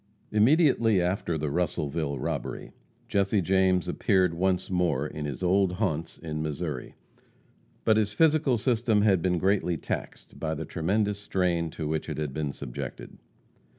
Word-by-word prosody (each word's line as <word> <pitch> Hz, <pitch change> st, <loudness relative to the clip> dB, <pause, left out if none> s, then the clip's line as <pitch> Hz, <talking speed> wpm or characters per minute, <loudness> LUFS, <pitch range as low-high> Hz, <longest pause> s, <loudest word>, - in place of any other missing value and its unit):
Immediately 115 Hz, -, +4 dB
after 90 Hz, -2 st, -1 dB
the 75 Hz, -1 st, -2 dB
Russellville 75 Hz, -3 st, -1 dB
robbery, -, -, -4 dB, 0.4 s
Jesse 100 Hz, +1 st, +1 dB
James 95 Hz, 0 st, +2 dB
appeared 95 Hz, -3 st, +2 dB
once 90 Hz, +1 st, 0 dB
more 85 Hz, -7 st, +1 dB
in 75 Hz, 0 st, -5 dB
his 75 Hz, +5 st, -5 dB
old 95 Hz, 0 st, +3 dB
haunts 85 Hz, -5 st, -2 dB
in 75 Hz, -2 st, -5 dB
Missouri. 75 Hz, -3 st, -4 dB, 0.9 s
But 110 Hz, -1 st, +4 dB
his 105 Hz, -1 st, +1 dB
physical 150 Hz, -2 st, +3 dB
system 115 Hz, -3 st, +2 dB
had 95 Hz, -5 st, +4 dB
been 90 Hz, 0 st, +1 dB
greatly 90 Hz, -1 st, +1 dB
taxed -, -, -6 dB
by 80 Hz, -1 st, -2 dB
the 80 Hz, +1 st, -5 dB
tremendous 100 Hz, +6 st, 0 dB
strain 90 Hz, -4 st, 0 dB
to 80 Hz, -, -2 dB
which 80 Hz, 0 st, -2 dB
it -, -, -4 dB
had 75 Hz, -3 st, -3 dB
been 75 Hz, 0 st, -2 dB
subjected. 65 Hz, -3 st, -7 dB
90 Hz, 150 wpm, -27 LUFS, 80-100 Hz, 0.9 s, Immediately